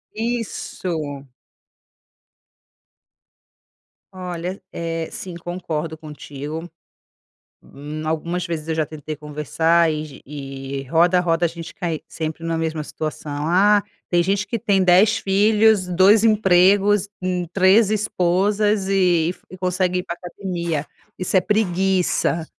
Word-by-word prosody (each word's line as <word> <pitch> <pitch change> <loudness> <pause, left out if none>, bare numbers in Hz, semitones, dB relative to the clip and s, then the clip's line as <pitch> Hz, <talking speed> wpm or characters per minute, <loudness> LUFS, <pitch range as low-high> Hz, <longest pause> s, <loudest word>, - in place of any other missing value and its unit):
Isso. 185 - -3 2.9
Olha, 180 0 -5
eh, 165 -1 -3
sim, 180 -2 -7
concordo 165 -2 -4
contigo. 150 +1 -7 0.9
Hum, 150 +2 -8
algumas 170 +3 -2
vezes 165 -3 -4
eu 160 - -1
já 155 -1 +1
tentei 155 0 -7
conversar 155 +3 +1
e 150 -2 -6
e 135 -1 -6
roda, 175 +3 +4
roda 170 -1 +1
e - - +4
a - - -6
gente 165 0 -9
cai 165 -3 -3
sempre 160 0 -5
na 165 0 -1
mesma 160 -1 -2
situação. 150 -1 -5
"Ah, 205 +4 +4 0.3
tem 175 -1 +3
gente 195 +3 0
que 225 +2 -3
tem 200 -4 +2
10 185 +4 +5
filhos, 210 0 +3
2 190 +5 +5
empregos, 205 -1 +4
hum, 180 -1 -1
3 195 +3 +5
esposas 205 0 +1
e 180 -3 +2 0.2
e 185 - -10
consegue 180 0 0
ir - - -4
pra 170 - -5
academia. 170 -4 -4 0.3
Isso 185 +1 +1
é - - +4
preguiça." 190 -4 +1
175 Hz, 120 wpm, -21 LUFS, 160-195 Hz, 2.9 s, 10